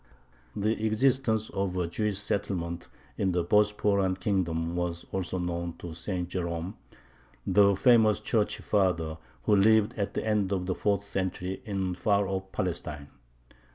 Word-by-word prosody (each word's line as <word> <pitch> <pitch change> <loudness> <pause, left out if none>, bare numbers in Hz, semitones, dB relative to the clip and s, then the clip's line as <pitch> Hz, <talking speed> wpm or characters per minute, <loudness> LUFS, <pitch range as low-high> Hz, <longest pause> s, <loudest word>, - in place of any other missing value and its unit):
The 110 +2 0
existence 110 -1 +1
of 95 -2 -2
a 90 - +1
Jewish 100 +4 -1
settlement 90 -4 -2 0.3
in 95 -2 +1
the 90 -1 +1
Bosporan 105 -1 +2
kingdom 85 -4 -1
was 90 -1 -3
also 95 -1 -2
known 85 -1 -3
to 85 -2 -7
St. 90 +1 -3
Jerome, 85 +1 -3 0.7
the 100 +1 +5
famous 110 0 +5
Church 110 -3 0
father, 85 -6 0 0.2
who 105 - +4
lived 110 +2 +4
at 100 - -2
the - - -2
end 105 -3 +1
of 95 -2 -1
the 95 - 0
fourth 100 +1 0
century 95 -1 -3
in 95 -4 -2
far 100 +2 +1
off 95 0 -4
Palestine. 80 -6 -3
95 Hz, 145 wpm, -28 LUFS, 90-105 Hz, 0.7 s, the